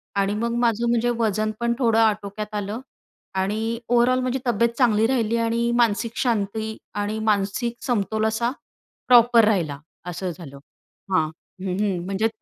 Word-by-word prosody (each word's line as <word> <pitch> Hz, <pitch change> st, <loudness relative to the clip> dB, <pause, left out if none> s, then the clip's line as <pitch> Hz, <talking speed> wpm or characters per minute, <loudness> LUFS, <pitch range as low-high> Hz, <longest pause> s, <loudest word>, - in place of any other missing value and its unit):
आणि 200 Hz, +1 st, +1 dB
मग 235 Hz, +2 st, -1 dB
माझं 235 Hz, 0 st, +1 dB
म्हणजे 240 Hz, 0 st, +2 dB
वजन 215 Hz, -1 st, 0 dB
पण 235 Hz, 0 st, +1 dB
थोडं 230 Hz, -3 st, +3 dB
आटोक्यात 210 Hz, -1 st, 0 dB
आलं 205 Hz, +2 st, -3 dB, 0.6 s
आणि 220 Hz, +4 st, -2 dB
ओव्हरऑल 245 Hz, +1 st, +4 dB
माझी 255 Hz, +1 st, -1 dB
तब्येत 235 Hz, 0 st, +3 dB
चांगली 225 Hz, -4 st, +3 dB
राहिली 235 Hz, -3 st, +1 dB
आणि 235 Hz, +1 st, 0 dB
मानसिक 230 Hz, 0 st, +1 dB
शांती 220 Hz, -2 st, -1 dB, 0.2 s
आणि 205 Hz, +1 st, -2 dB
मानसिक 215 Hz, +3 st, 0 dB
समतोल 220 Hz, -2 st, 0 dB
असा 235 Hz, +2 st, 0 dB, 0.6 s
प्रॉपर 240 Hz, -2 st, +6 dB
राहिला. 165 Hz, -10 st, 0 dB, 0.3 s
असं 180 Hz, +1 st, -4 dB
झालं 140 Hz, -6 st, -10 dB, 0.6 s
हां. 160 Hz, -4 st, +3 dB
हं, 185 Hz, +3 st, -7 dB
हं 200 Hz, -4 st, 0 dB
म्हणजे, 195 Hz, +3 st, 0 dB
220 Hz, 145 wpm, -23 LUFS, 200-235 Hz, 0.6 s, प्रॉपर